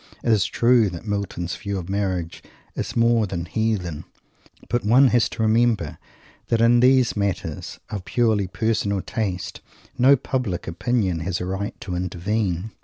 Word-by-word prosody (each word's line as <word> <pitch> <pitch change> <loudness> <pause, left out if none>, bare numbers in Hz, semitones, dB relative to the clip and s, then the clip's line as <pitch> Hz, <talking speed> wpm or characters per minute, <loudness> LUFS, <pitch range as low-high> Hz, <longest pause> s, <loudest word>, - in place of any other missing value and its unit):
It 120 - +2
is 105 -5 +3
true 120 -3 +3
that 85 +3 -8
Milton's 100 -4 -3
view 100 -1 -4
of 90 -2 -6
marriage 95 -4 -2 0.3
is - - -4
more 115 -2 +3
than 85 -2 -4
"heathen." 90 -6 -2 0.6
But 120 +1 -1
one 125 +6 +5
has 120 -2 +3
to 110 - -3
remember 115 0 +1 0.5
that 115 - +1
in 120 +1 +5
these 130 0 +4
matters 100 -6 -3
of 100 -3 -4
purely 110 -3 +1
personal 100 -1 -1
taste 95 -5 -4 0.4
no 135 +3 +7
public 125 -8 -3
opinion 95 0 0
has 90 +2 -2
right 95 +3 -4
to 90 - -4
intervene. 90 +2 -2
105 Hz, 150 wpm, -23 LUFS, 90-115 Hz, 0.6 s, no